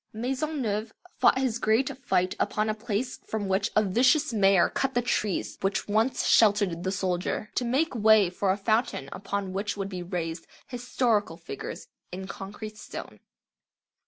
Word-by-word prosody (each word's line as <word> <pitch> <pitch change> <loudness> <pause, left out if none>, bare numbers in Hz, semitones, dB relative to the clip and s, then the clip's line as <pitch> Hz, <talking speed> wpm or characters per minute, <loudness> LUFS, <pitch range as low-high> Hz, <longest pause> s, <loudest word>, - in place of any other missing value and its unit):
Maisonneuve 245 -3 -2 0.3
fought - - +5
his 255 -3 0
great 225 +4 +2
fight 185 +1 +1
upon 215 0 0
a - - +1
place 220 +3 -3
from 215 -2 -2
which 195 +3 +1
a 215 - +5
vicious 255 - +3
mayor 195 -4 +5
cut 270 -1 -2
the 245 - +3
trees 210 -5 -1
which 195 0 -1
once 220 +5 +1
sheltered 205 -6 +4
the 190 - -1
soldier, 185 +2 -2
to - - 0
make 270 +7 +1
way 220 -3 +5
for 185 +2 -1
a 190 - 0
fountain 215 - 0
upon 195 0 -4
which 200 +2 -2
would 195 -1 -3
be 185 -2 -5
raised 170 -2 -4 0.2
"historical" 240 -7 0
figures 165 -5 -7 0.2
in 190 +1 -6
concrete 210 +3 -8
stone. - - -8
210 Hz, 160 wpm, -27 LUFS, 190-235 Hz, 0.3 s, fought